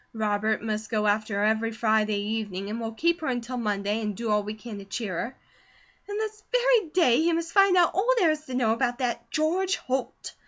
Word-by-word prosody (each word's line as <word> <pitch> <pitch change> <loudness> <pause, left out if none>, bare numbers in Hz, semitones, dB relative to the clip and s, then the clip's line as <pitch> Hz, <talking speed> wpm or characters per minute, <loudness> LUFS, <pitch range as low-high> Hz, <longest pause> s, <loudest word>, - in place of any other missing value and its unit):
Robert 215 0 0
must 215 0 -3
go 215 -2 0
after 215 0 +1
her 200 - +1
every 220 +1 +1
Friday 215 -2 +1
evening, 205 -2 -3
and 230 +2 -4
we'll 225 0 -3
keep 335 +9 0
her 315 - -3
until 250 0 -3
Monday, 210 -1 -1
and 210 -3 -3
do 230 -2 -2
all 210 0 +3
we 210 +1 -6
can 215 -1 -8
to 200 - -10
cheer 200 -1 -4
her; 235 +9 -4 0.7
and 410 +1 -3
this 430 -1 -4
very - - +3
day 305 -8 +4
he 325 +3 +2
must 335 0 -2
find 390 -2 +5
out 350 -1 +4
all 390 +7 0
there 350 -8 +4
is 310 0 -4
to 260 - -6
know 230 -3 +2
about 245 0 0
that 250 -3 -3
George 360 +5 +1
Holt. 260 0 -4
230 Hz, 225 wpm, -26 LUFS, 215-325 Hz, 0.7 s, find